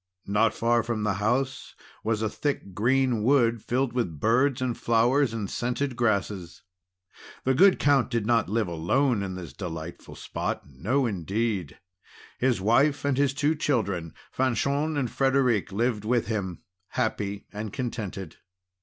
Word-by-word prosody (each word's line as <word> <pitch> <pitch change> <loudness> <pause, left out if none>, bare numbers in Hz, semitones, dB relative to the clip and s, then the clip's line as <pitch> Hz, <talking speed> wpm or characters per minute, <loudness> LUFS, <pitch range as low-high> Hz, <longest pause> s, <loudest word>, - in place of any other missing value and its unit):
Not 105 +3 +2
far 120 +1 +2
from 115 -2 -3
the 105 -1 +1
house 130 +5 -1 0.3
was 110 0 0
a - - +2
thick 125 -4 -3
green 125 +2 +2
wood 120 -2 +3
filled 125 +2 -1
with 90 - -2
birds 125 - +2
and 125 -2 -1
flowers 120 +3 +2
and 110 -3 -3
scented 125 +5 -2
grasses. 100 -7 -1 0.8
The 130 - +2
good 185 +7 +6
Count 140 -3 +3
did 115 -4 -1
not 115 -4 +2
live 110 -1 0
alone 100 - +1
in 95 -2 -4
this 90 -2 -8
delightful 85 -3 -7
spot; - - -4
no 105 - 0
indeed, 100 - -2 0.6
his 125 -5 +2
wife 140 +8 +3
and 140 -2 +2
his 135 0 +1
two 150 +2 +2
children, 100 - -1 0.2
Fanchon 140 +5 0
and 135 -3 +1
Frederic, 130 -7 +2
lived 110 +1 0
with 120 +2 +1
him, 100 -5 -3 0.2
happy 100 -4 -2
and 105 0 -5
contented. 105 -8 -5
115 Hz, 145 wpm, -26 LUFS, 100-130 Hz, 0.8 s, good